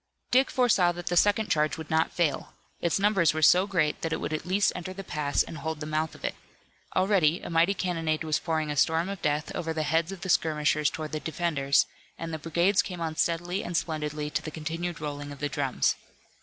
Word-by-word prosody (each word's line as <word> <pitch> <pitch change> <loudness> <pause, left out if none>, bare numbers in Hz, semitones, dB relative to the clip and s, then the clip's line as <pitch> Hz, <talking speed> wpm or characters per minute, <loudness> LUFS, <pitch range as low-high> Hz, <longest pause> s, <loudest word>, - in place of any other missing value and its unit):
Dick 260 +1 +4
foresaw 215 -9 +3
that 175 0 -8
the 175 - -1
second 205 +3 +3
charge 150 0 +2
would 160 0 -8
not 160 0 +2
fail. 160 -5 -1 0.2
Its 170 - +1
numbers 195 -6 +3
were 155 - -1
so 180 +5 +6
great 170 -7 0
that 165 - -2
it - - -1
would - - -3
at 155 - -4
least 195 +2 +3
enter 180 +1 -5
the 195 +1 -7
pass 150 -4 0
and 160 - -8
hold 160 +1 -4
the 150 - -5
mouth 155 +1 -2
of - - -8
it. - - -1 0.6
Already 185 -4 +3
a - - -7
mighty 170 +4 +3
cannonade 165 -4 -1
was 155 -1 0
pouring 160 -2 -1
a - - -3
storm 160 +5 +2
of 200 -1 -5
death 150 +1 -1
over 165 -1 -3
the 155 -1 -1
heads 160 +4 +1
of 195 -2 -8
the 185 - -5
skirmishers 150 -3 +2
toward 155 -1 -6
the 155 - -2
defenders, 150 -4 +1 0.3
and 165 0 -5
the 160 - -3
brigades 175 +5 +2
came 180 -1 -7
on 160 -1 -3
steadily 175 +4 0
and 175 -1 -2
splendidly 150 -2 -3
to - - -1
the - - -6
continued 165 +2 -4
rolling 145 -1 -5
of 145 - -8
the 145 +1 -2
drums. 135 -4 +1
160 Hz, 225 wpm, -27 LUFS, 150-175 Hz, 0.6 s, so